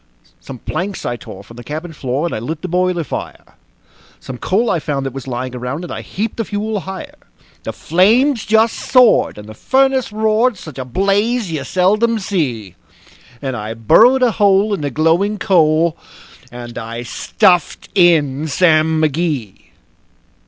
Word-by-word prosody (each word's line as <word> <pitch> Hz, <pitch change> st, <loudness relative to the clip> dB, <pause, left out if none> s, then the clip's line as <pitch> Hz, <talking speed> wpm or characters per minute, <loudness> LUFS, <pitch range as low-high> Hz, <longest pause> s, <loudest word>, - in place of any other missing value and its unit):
Some 135 Hz, -, -9 dB
planks 190 Hz, -, -4 dB
I 120 Hz, -, -2 dB
tore 100 Hz, -4 st, -11 dB
from 115 Hz, +3 st, -15 dB
the 120 Hz, -, -9 dB
cabin 160 Hz, +6 st, -6 dB
floor, 135 Hz, +1 st, -2 dB
and 170 Hz, -, -3 dB
I -, -, -3 dB
lit 155 Hz, +8 st, -5 dB
the -, -, -2 dB
boiler 180 Hz, -1 st, 0 dB
fire; 140 Hz, -, -6 dB, 0.8 s
Some 125 Hz, -2 st, -9 dB
coal 220 Hz, +5 st, +1 dB
I 170 Hz, -, +1 dB
found 140 Hz, -2 st, -3 dB
that 135 Hz, -, -4 dB
was 135 Hz, -1 st, -8 dB
lying 125 Hz, 0 st, -4 dB
around, 125 Hz, +7 st, -4 dB
and 175 Hz, -, -6 dB
I -, -, -5 dB
heaped 210 Hz, +3 st, -4 dB
the 225 Hz, -, -2 dB
fuel 210 Hz, +1 st, -3 dB
higher; 190 Hz, 0 st, -8 dB, 0.5 s
The -, -, -5 dB
flames 225 Hz, -, +2 dB
just 220 Hz, +1 st, +3 dB
soared, 250 Hz, -, +3 dB
and 105 Hz, 0 st, -10 dB
the 110 Hz, -, -9 dB
furnace 265 Hz, -, +1 dB
roared 220 Hz, +2 st, +1 dB
such 155 Hz, -6 st, -10 dB
a 130 Hz, -, -4 dB
blaze 200 Hz, -, 0 dB
you 155 Hz, -3 st, -3 dB
seldom 215 Hz, +5 st, +1 dB
see; 135 Hz, -, -3 dB, 0.7 s
And 135 Hz, -2 st, -2 dB
I 110 Hz, 0 st, -5 dB
burrowed 235 Hz, -, +5 dB
a 245 Hz, -, +4 dB
hole 205 Hz, 0 st, +3 dB
in 195 Hz, -, -2 dB
the 145 Hz, -, -2 dB
glowing 165 Hz, +9 st, +1 dB
coal, 165 Hz, -4 st, +2 dB, 0.6 s
and 120 Hz, -1 st, -8 dB
I 115 Hz, +1 st, -6 dB
stuffed 180 Hz, -, +1 dB
in 160 Hz, -5 st, +3 dB
Sam 160 Hz, -1 st, +3 dB
McGee. 150 Hz, -, -1 dB
170 Hz, 165 wpm, -17 LUFS, 135-205 Hz, 0.8 s, burrowed